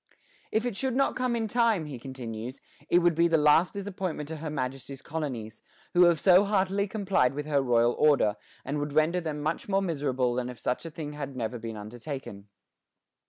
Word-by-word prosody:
If 220 +2 +1
it 245 -4 -2
should 260 +2 -1
not 275 +1 +2
come 250 -1 0
in 225 -1 -1
time, 225 -6 +2
he 140 -5 -7
continues, 125 -1 -7 0.3
"it 175 0 +4
would 175 -1 +4
be 170 +2 +3
the 165 -1 +3
last 150 +4 +4
disappointment 190 -6 -4
to 160 - -5
her 155 +1 -5
Majesty's 135 -1 -5
colonies, 125 -9 -5 0.3
who 180 0 +7
have 170 -2 +4
so 185 0 +6
heartily 200 0 +1
complied 190 - +1
with 150 0 -3
her 145 -2 +2
royal 120 -2 +3
order, 140 -9 +4 0.3
and 145 +2 -2
would 145 0 -3
render 155 +4 +2
them 150 -3 -4
much 160 +6 -2
more 195 0 +3
miserable 135 -7 0
than 125 0 -2
if 125 - -8
such 125 +8 -2
a - - -5
thing 150 -2 -6
had 140 -2 -6
never 120 -1 -3
been 110 -1 -6
undertaken." 110 -1 -7
150 Hz, 200 wpm, -28 LUFS, 125-180 Hz, 0.3 s, who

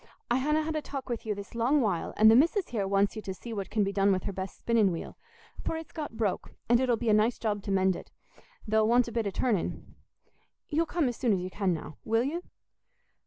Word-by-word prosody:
I 240 - +4
hanna 300 +4 +1
had 315 0 -3
a 310 - 0
talk 275 -3 -6
with 235 -2 -4
you 210 - 0
this 200 0 -9
long 240 +6 +2
while, 205 -9 -1
and 220 +1 +8
the - - +6
missis 335 - +3
here 205 -5 -1
wants 200 +2 +2
you 215 - -5
to 190 -2 -5
see 230 +4 -8
what 200 -3 -4
can 215 -2 +1
be 195 0 -1
done 200 0 +3
with 185 -2 0
her - - -2
best 190 +1 -6
spinning 225 -5 +2
wheel, 165 - -6 0.5
for 325 - -2
it's 320 - -8
got 295 -8 -6
broke, 210 -5 -2
and 240 0 +5
it'll 250 -2 +2
be 230 - -1
a - - +5
nice 215 +3 +3
job 210 -2 -1
to 200 - -4
mend 190 -1 +3
it—there'll 220 - -4
want 240 +1 +4
a - - -5
bit 230 -2 -1
o' - - +1
turning. 205 -1 -2 0.8
You'll 325 +2 +1
come 335 -6 +1
as 245 - -3
soon 240 -5 +2
as 190 - +1
you 185 +1 -5
can 195 -2 0
now, 160 -2 -5
will 225 +1 +2
you?" 315 +7 -2
225 Hz, 250 wpm, -29 LUFS, 200-255 Hz, 0.8 s, and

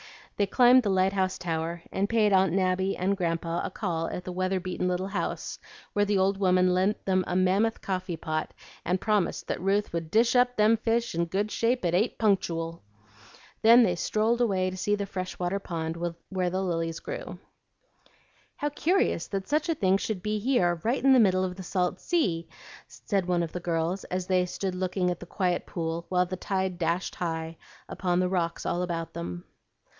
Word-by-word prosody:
They 200 - +1
climbed 250 +4 +6
the 210 - -1
lighthouse 190 0 +1
tower, 165 0 -3
and 200 +1 -1
paid 215 -3 +3
Aunt 190 -2 +4
Nabby 190 +1 +1
and 195 +2 +1
Grandpa 170 -2 -1
a - - -2
call 165 -5 -2
at 180 - -5
the 185 - -6
weather 185 +1 0
beaten 180 0 -3
little 180 +1 -1
house, 185 -4 -3 0.3
where 205 0 +2
the 205 -1 +1
old 195 +1 +2
woman 185 -1 +3
lent 190 +4 0
them 185 -1 +2
a 180 - -2
mammoth 195 +5 +2
coffee 185 -3 -3
pot, 155 0 -3 0.3
and 180 +2 0
promised 210 -4 0
that - - -3
Ruth 200 +1 0
would 165 -2 -3
"dish 230 +6 +3
up 245 0 +4
them 215 +2 +5
fish 230 +1 0
in 170 +1 0
good 200 +5 -2
shape 235 -2 0
at 170 - +1
eight 205 +7 +1
punctooal." 170 -6 0 0.8
Then 235 +2 +8
they 185 -6 +2
strolled 220 +6 0
away 190 -5 +1
to 185 - -7
see 205 +2 +1
the 205 -1 -3
fresh 185 -1 -5
water 180 +2 -1
pond 165 -4 -4 0.3
where 185 -2 0
the 190 +2 -1
lilies 165 -2 -2
grew. - - -6 1.2
"How 295 - -2
curious 320 - +1
that 195 -1 -4
such 305 +3 0
a 330 - +2
thing 195 -7 +3
should 200 -2 -4
be 210 0 -1
here 185 -8 +1
right 240 +4 0
in 270 0 +6
the 260 - +6
middle 185 -4 +4
of 180 -1 -3
the 190 - -8
salt 180 -1 -1
sea!" 185 - 0 0.4
said 195 -4 -2
one 175 -1 +1
of 165 - -4
the 180 - -4
girls, 170 +2 -1
as 185 0 -3
they 185 -1 +2
stood 190 +1 -3
looking 180 0 0
at 175 - -4
the 175 - -10
quiet 180 -1 -1
pool 165 0 -3
while 180 -1 +2
the 185 +1 -5
tide 190 -1 -2
dashed 170 +2 -1
high 165 -1 -4 0.3
upon 180 -2 -1
the 180 0 +1
rocks 170 -3 -1
all 175 - 0
about 165 -2 -3
them. 85 +1 -5
185 Hz, 200 wpm, -27 LUFS, 175-205 Hz, 1.2 s, Then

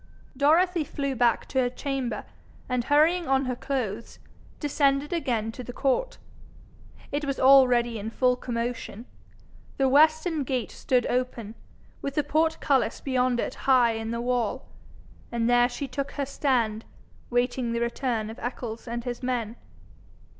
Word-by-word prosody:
Dorothy 330 +5 +3
flew 275 -1 -3
back 240 -2 +2
to 265 - 0
her 250 -1 +2
chamber, 265 -1 -3 0.4
and 250 -2 -1
hurrying 320 +4 +3
on 270 0 +2
her 250 -1 -2
clothes, 240 -5 -4 0.4
descended 285 0 +1
again 240 -9 -1
to 250 - -8
the 245 - -7
court. 275 - 0 0.9
It 290 +1 -2
was 275 -1 -2
already 250 -4 +5
in 210 +2 -4
full 250 +2 +2
commotion. 235 -2 -4 0.7
The 270 - +3
western 310 +3 +3
gate 250 -4 -2
stood 250 -2 0
open, 245 -4 -2 0.5
with 275 - -4
the 300 - +2
portcullis 295 -5 +1
beyond 255 -2 0
it - - -2 0.2
high 250 -3 +5
in 225 0 -4
the 235 +1 -2
wall, 245 0 -1 0.7
and 235 -1 0
there 245 0 +4
she 265 +3 -5
took 275 +2 -4
her 280 - -2
stand, 240 -6 0 0.5
waiting 245 0 0
the 235 - -1
return 235 -2 -2
of 225 - -11
Eccles 235 -1 -5
and 235 0 -4
his 240 -1 -5
men. 240 -3 -2
250 Hz, 145 wpm, -26 LUFS, 235-275 Hz, 0.9 s, already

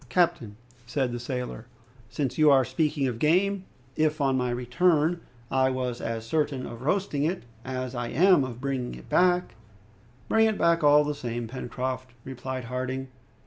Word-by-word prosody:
"Captain," 130 - +1 0.3
said 130 -1 -1
the 120 - -4
sailor, 125 -1 -5 0.4
"since 135 0 -2
you 155 -1 +5
are 135 -2 +5
speaking 145 +2 0
of 120 -3 -3
game, 185 +6 +2 0.3
if 155 0 +1
on 135 -2 +2
my 125 -1 0
return, 155 +7 +1 0.3
I 130 0 +3
was 125 -2 -3
as 115 -1 -3
certain 140 0 -1
of 115 - -8
roasting 155 -1 0
it 175 +4 -1 0.2
as 130 0 -4
I 120 -1 -3
am 180 +1 +4
of 125 -2 -6
bringing 130 - -3
it 60 0 -13
back 180 0 +3 0.4
" 115 +5 -30
"Bring 220 0 +4
it 220 - 0
back 170 -1 +3
all 145 0 +6
the 150 0 -1
same, 120 -4 -4
Pencroft," 130 0 -5
replied 130 0 -5
Harding. 130 +2 -4
130 Hz, 170 wpm, -27 LUFS, 125-155 Hz, 0.4 s, all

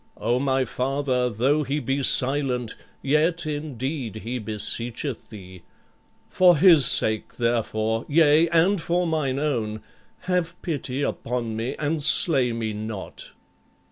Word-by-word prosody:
O 120 +3 0
my 135 -1 0
father, 130 0 -1
though 130 +7 +1
he 145 +1 -2
be 135 +1 -2
silent, 130 -3 0 0.3
yet, 160 +4 +1
indeed, 145 -5 -4
he 125 +3 -4
beseecheth 115 +4 -4
thee. 95 -4 -12 0.7
For 180 -3 +4
his 160 -5 +6
sake, 110 -1 +3
therefore, 115 -1 -1
yea, 155 +1 +4
and 170 +3 +2
for 175 +2 0
mine 155 -5 -1
own, 115 -8 -2 0.4
have 180 -2 -2
pity 145 -5 -3
upon 120 -4 -3
me 115 +5 -3
and 150 +1 -2
slay 140 -3 +3
me 115 -2 -3
not." 105 -2 -7
135 Hz, 125 wpm, -24 LUFS, 115-150 Hz, 0.7 s, his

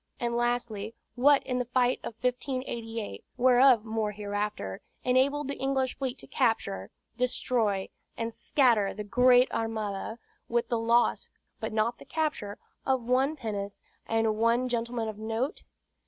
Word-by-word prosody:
And 235 0 -1
lastly, 235 -3 -1 0.2
what 275 +3 +5
in 250 -1 -1
the 250 - -1
fight 250 0 +2
of 225 - -6
1588, 240 - -3
whereof 250 -2 +6
more 220 -1 -1
hereafter, 205 - -3 0.2
enabled 265 +3 +2
the 280 - -4
English 265 -1 0
fleet 265 -1 -2
to - - -11
capture, 160 - 0 0.3
destroy, 235 -5 0 0.3
and 230 0 -3
scatter 230 -9 +2
that 210 -1 -7
Great 250 0 +6
Armada, 220 -1 -3 0.3
with 235 0 0
the 235 -2 +1
loss 235 +1 +2 0.3
(but - - -3
not 220 +2 0
the - - -12
capture) 300 -11 -2 0.3
of 260 -2 +1
one 260 +5 +2
pinnace, 205 -6 -4 0.3
and 225 -1 +1
one 235 +2 +3
gentleman 235 -1 -2
of 215 -1 -6
note? 225 - -2
235 Hz, 140 wpm, -29 LUFS, 220-255 Hz, 0.3 s, whereof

